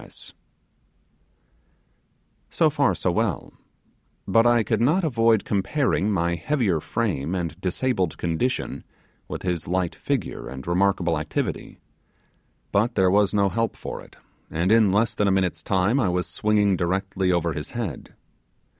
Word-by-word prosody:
So - - +2
far - - +2
so - - 0
well; - - -2 0.7
but 115 +4 +4
I 120 -1 +4
could 110 0 0
not 155 +10 +3
avoid 115 - +2
comparing 105 +1 0
my 85 -3 +1
heavier 95 - 0
frame 90 -5 -2
and 85 -1 -4
disabled 95 -2 -1
condition 85 +10 -2 0.4
with - - -6
his 90 -4 -2
light 90 0 0
figure - - -3
and 65 0 -8
remarkable 90 -2 +1
activity; 75 - -4 0.9
but 115 +4 +1
there 95 -2 +3
was 100 0 +3
no 100 -2 +2
help 115 +3 -1
for - - -7
it, - - -16 0.3
and 85 +5 0
in 110 -3 +5
less 110 +4 +2
than 105 - +1
a - - +3
minute's 95 -3 0
time 95 +9 +1
I 105 - +2
was 90 0 0
swinging 105 -2 +1
directly 95 +1 -1
over 85 -2 0
his 75 - -5
head. 100 - -5
95 Hz, 140 wpm, -24 LUFS, 85-110 Hz, 0.9 s, in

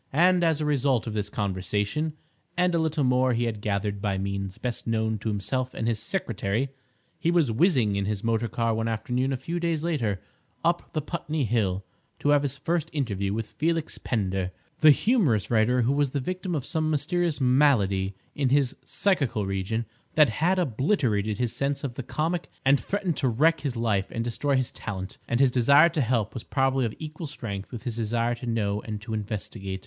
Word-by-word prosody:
And, 180 +1 +5
as 160 -2 +2
a 155 - -1
result 135 -5 +2
of 115 - -4
this 105 -1 -2
conversation, 105 - -1 0.4
and 180 0 +3
a 170 - +2
little 160 -2 0
more 125 0 +3
he 120 +1 +1
had 110 -3 -2
gathered 100 -1 -1
by 100 -2 0
means 100 0 -3
best 125 -2 -4
known 110 -1 0
to 110 - -2
himself 110 +5 -2
and 115 - -2
his 115 -3 0
secretary, 115 - -2 0.5
he 165 - +1
was 170 -8 +3
whizzing 120 - +3
in 100 0 0
his 105 -1 -2
motor 115 0 +1
car 115 +1 0
one 115 +1 -1
afternoon 125 +4 -1
a 135 - 0
few 165 +7 -3
days 165 -2 -1
later 120 - 0 0.5
up 170 +1 +1
the 155 - -1
Putney 155 -3 -2
Hill 100 -4 0 0.3
to 145 - 0
have 145 -1 +5
his 140 -1 -3
first 165 -1 -1
interview 100 -9 -1
with 110 +2 -2
Felix 165 +5 -2
Pender, 95 -5 -1 0.3
the 155 - +7
humorous 150 - +3
writer 120 +2 +3
who 130 +4 +2
was 145 -1 +2
the 140 - -2
victim 180 +5 -3
of 140 -4 -2
some 155 +1 0
mysterious 160 +2 0
malady 115 -8 +3 0.2
in 140 -3 0
his 135 -1 +2
"psychical 140 - +1
region" 95 +4 -2 0.3
that 150 -4 +6
had 170 +11 +1
obliterated 120 - +1
his 120 -1 -1
sense 140 +1 -1
of 135 -4 -3
the 135 - -5
comic 160 +6 -2 0.2
and 135 +1 +5
threatened 195 -5 -2
to 135 - +1
wreck 155 +8 +3
his 140 -4 -3
life 110 -4 +1
and 115 - -3
destroy 135 +4 0
his 130 -2 0
talent. 95 -3 -6
And 120 - 0
his 135 -2 +5
desire 140 +7 +6
to 160 -2 -1
help 115 -4 0
was 120 - -6
probably 135 -1 +1
of 110 - -7
equal 155 +1 -6
strength 105 -9 -6
with 120 -4 -7
his 120 -2 -4
desire 115 +1 0
to 120 +1 -7
know 105 -3 0
and 105 -2 -5
to 110 0 -6
investigate. 100 -2 -4
125 Hz, 200 wpm, -26 LUFS, 105-150 Hz, 0.5 s, the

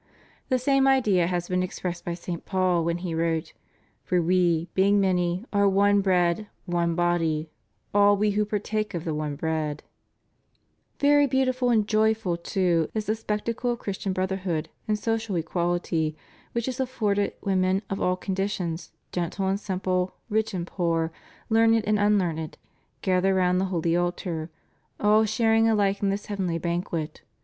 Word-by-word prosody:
"^ - - -40 0.5
The 255 - +3
same 270 +1 +3
idea 210 -10 +3
had 175 -1 -2
been 180 0 0
expressed 180 -1 -4
by 175 - -3
St. 175 -1 -6
Paul 185 -3 +1
when 170 +1 0
he 170 - -2
wrote: 165 0 -1 0.5
Far 180 - +1
we, 175 -1 +2
being 200 +2 +4
many, 180 0 +1
are 200 0 +4
one 200 +1 +4
bread, 180 +1 +1 0.2
one 170 -2 0
body, 165 -3 0 0.4
all 205 0 +5
we 210 +1 +2
who 210 +1 +1
partake 210 0 -2
of 165 - -3
the 160 - -1
one 150 -1 -3
bread} 155 -1 -2 1.2
Very 290 0 +5
beautiful 255 -1 +1
and 220 -3 +3
joyful 215 -4 +2
too 170 -2 0
is 215 -1 -1
the 215 - +1
spectacle 225 +2 -2
of 240 - 0
Christian 200 -2 -4
brotherhood 185 -4 -2 0.2
and 215 -1 +1
social 225 -2 -2
equality 170 -2 -1 0.4
which 235 0 -1
is 260 0 -3
afforded 210 -6 0
when 190 -2 +1
men 190 +2 +1
of 195 - -4
all 180 - +2
conditions, 185 -3 -3 0.2
gentle 180 +2 -2
and 195 +1 0
simple, 185 -2 -1 0.2
rich 220 +1 +1
and 170 -2 -2
poor, 165 -3 -1 0.4
learned 225 0 +4
and 210 0 +2
unlearned, 180 -7 +1 0.5
gather 190 +1 +2
round 180 0 +2
the - - +1
holy 170 -3 0
altar, 175 -2 -2 0.5
all 215 +1 +4
sharing 225 +1 +3
alike 200 -2 +1
in 200 - +2
this 200 +1 -2
heavenly 190 -5 -2
banquet. 170 -2 -3
190 Hz, 160 wpm, -26 LUFS, 170-210 Hz, 1.2 s, all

